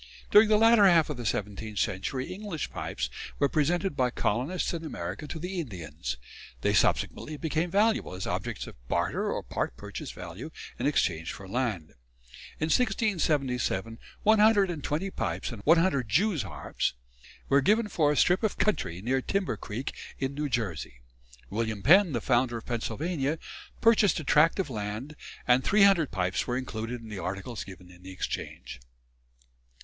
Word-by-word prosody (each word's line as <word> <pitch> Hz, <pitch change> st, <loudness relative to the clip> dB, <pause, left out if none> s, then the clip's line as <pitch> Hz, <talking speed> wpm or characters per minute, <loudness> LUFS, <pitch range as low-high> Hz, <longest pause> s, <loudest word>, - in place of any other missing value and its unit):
During 210 Hz, +1 st, +7 dB
the 215 Hz, -, +5 dB
latter 225 Hz, -2 st, +6 dB
half 165 Hz, -4 st, +4 dB
of 145 Hz, -, -5 dB
the 120 Hz, -2 st, -3 dB
seventeenth 105 Hz, +1 st, -3 dB
century 130 Hz, -, -2 dB
English 195 Hz, -6 st, -5 dB
pipes 65 Hz, -1 st, -3 dB, 0.3 s
were 140 Hz, -, +3 dB
presented 170 Hz, +4 st, 0 dB
by 130 Hz, -2 st, +2 dB
colonists 130 Hz, -, -1 dB
in 165 Hz, -1 st, -4 dB
America 100 Hz, -, -5 dB
to 160 Hz, -, -6 dB
the 180 Hz, +3 st, -4 dB
Indians; 85 Hz, -, -5 dB, 0.4 s
they -, -, +2 dB
subsequently 155 Hz, 0 st, +1 dB
became 160 Hz, +2 st, -1 dB
valuable 205 Hz, -, +2 dB
as 95 Hz, -, -5 dB
objects -, -, -3 dB
of -, -, -11 dB
barter -, -, 0 dB
or -, -, -3 dB
part -, -, -3 dB
purchase -, -, -7 dB
value 90 Hz, -, -8 dB, 0.3 s
in -, -, +1 dB
exchange 85 Hz, -, 0 dB
for 95 Hz, -, -9 dB
land. 105 Hz, -7 st, -2 dB, 0.7 s
In 155 Hz, -, 0 dB
1677 150 Hz, -, 0 dB, 0.2 s
one 215 Hz, 0 st, +5 dB
hundred 210 Hz, -3 st, +5 dB
and 155 Hz, -5 st, -6 dB
twenty 175 Hz, +7 st, -2 dB
pipes -, -, -3 dB
and 115 Hz, -4 st, -8 dB
one 165 Hz, +3 st, +6 dB
hundred 140 Hz, -, +1 dB
Jew's 180 Hz, -, +2 dB
harps -, -, -3 dB, 0.5 s
were 140 Hz, +1 st, +4 dB
given 215 Hz, +9 st, +3 dB
for 155 Hz, -7 st, +2 dB
a 150 Hz, -, -1 dB
strip 180 Hz, +1 st, +4 dB
of 220 Hz, -3 st, 0 dB
country 95 Hz, -, 0 dB
near 130 Hz, +3 st, +1 dB
Timber 195 Hz, +5 st, -1 dB
Creek, 115 Hz, +6 st, -5 dB, 0.2 s
in 135 Hz, 0 st, -2 dB
New 145 Hz, +1 st, -2 dB
Jersey. 90 Hz, -, -3 dB, 0.5 s
William 110 Hz, -1 st, -2 dB
Penn, 180 Hz, -, +6 dB
the 120 Hz, -, -1 dB
founder 120 Hz, 0 st, +2 dB
of 115 Hz, -, -9 dB
Pennsylvania, 145 Hz, +5 st, -2 dB, 0.4 s
purchased 220 Hz, -5 st, +4 dB
a -, -, -5 dB
tract 150 Hz, +3 st, +4 dB
of 185 Hz, -8 st, -2 dB
land, 110 Hz, +6 st, -5 dB, 0.3 s
and 125 Hz, +1 st, +5 dB
300 195 Hz, -7 st, +5 dB
pipes 95 Hz, -1 st, -1 dB
were 125 Hz, 0 st, 0 dB
included 120 Hz, -1 st, -4 dB
in 115 Hz, -, -10 dB
the 105 Hz, -3 st, -6 dB
articles 100 Hz, +6 st, -4 dB
given 90 Hz, -2 st, -12 dB
in 90 Hz, 0 st, -17 dB
the 95 Hz, -, -10 dB
exchange." 90 Hz, -7 st, -5 dB
135 Hz, 165 wpm, -28 LUFS, 105-180 Hz, 0.7 s, During